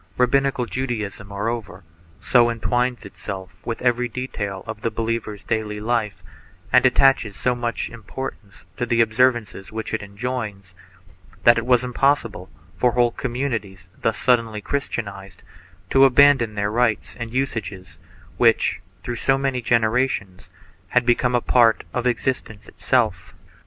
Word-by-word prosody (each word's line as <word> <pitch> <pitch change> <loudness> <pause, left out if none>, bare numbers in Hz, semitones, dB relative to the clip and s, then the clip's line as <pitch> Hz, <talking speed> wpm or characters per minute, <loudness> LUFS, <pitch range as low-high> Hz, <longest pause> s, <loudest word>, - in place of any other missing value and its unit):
Rabbinical 130 0 +2
Judaism, 110 -6 -4
moreover, 100 -1 -4 0.4
so 120 -2 +4
entwines 120 +2 -1
itself 95 -2 -8
with 115 0 -4
every 125 0 +2
detail 105 -6 -5
of 110 -1 -7
the 115 - 0
believer's 110 -2 -3
daily 110 -2 -2
life, 105 -4 -1 0.5
and - - +6
attaches 130 -7 +3
so 125 - +1
much 120 -1 -3
importance 115 -3 -8
to 120 - -2
the 115 0 +1
observances 115 -3 +1
which 110 0 -5
it 110 - -1
enjoins, 105 -2 -5 0.7
that 120 0 +6
it 115 - -6
was 125 -1 +4
impossible 125 -6 0 0.3
for 125 -1 +2
whole 120 -1 +3
communities 115 -8 -4
thus 110 - -1
suddenly 115 -4 +1
Christianized, 100 -7 -5 0.5
to 135 0 +7
abandon 135 -4 +5
the 100 0 0
rites 110 0 0
and 115 -1 -5
usages 110 -8 -4 0.4
which, - - +3 0.2
through 120 -1 -4
so 135 +2 +2
many 135 -2 -1
generations, 115 -4 0 0.4
had 125 +4 +2
become 125 0 +2
a 120 - +2
part 115 -3 +4
of 125 0 0
exist 125 +2 -1
ence 105 -2 -14
itself. - - -1
115 Hz, 135 wpm, -22 LUFS, 105-125 Hz, 0.7 s, to